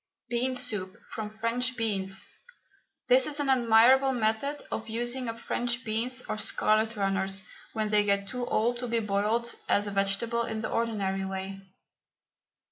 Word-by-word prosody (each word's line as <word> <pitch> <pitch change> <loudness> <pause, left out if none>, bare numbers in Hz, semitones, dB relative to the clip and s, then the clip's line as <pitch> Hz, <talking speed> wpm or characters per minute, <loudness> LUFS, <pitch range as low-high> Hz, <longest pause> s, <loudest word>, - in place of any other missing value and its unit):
BEAN 250 +2 0
SOUP 210 -6 -1
FROM 215 -2 -5
FRENCH 230 +3 -1
BEANS. 195 -4 0 0.8
This - - +5
is 295 0 -2
an 285 -2 0
admirable 255 +2 +5
method 240 +5 0
of 225 0 -4
using 240 +2 -2
up 230 0 -6
French 240 +2 -2
beans 240 +4 -1
or 215 0 -4
scarlet 220 +1 +2
runners 195 -1 -1 0.3
when 215 -1 -1
they 210 -1 +5
get 200 -1 +1
too 250 +1 -4
old 240 +2 +1
to 245 - -3
be 230 0 +1
boiled 215 +3 0 0.2
as 205 - +3
a 205 - -3
vegetable 200 +4 +1
in 220 -1 -3
the - - -3
ordinary 200 -4 -1
way. 190 0 -5
225 Hz, 155 wpm, -28 LUFS, 205-240 Hz, 0.8 s, This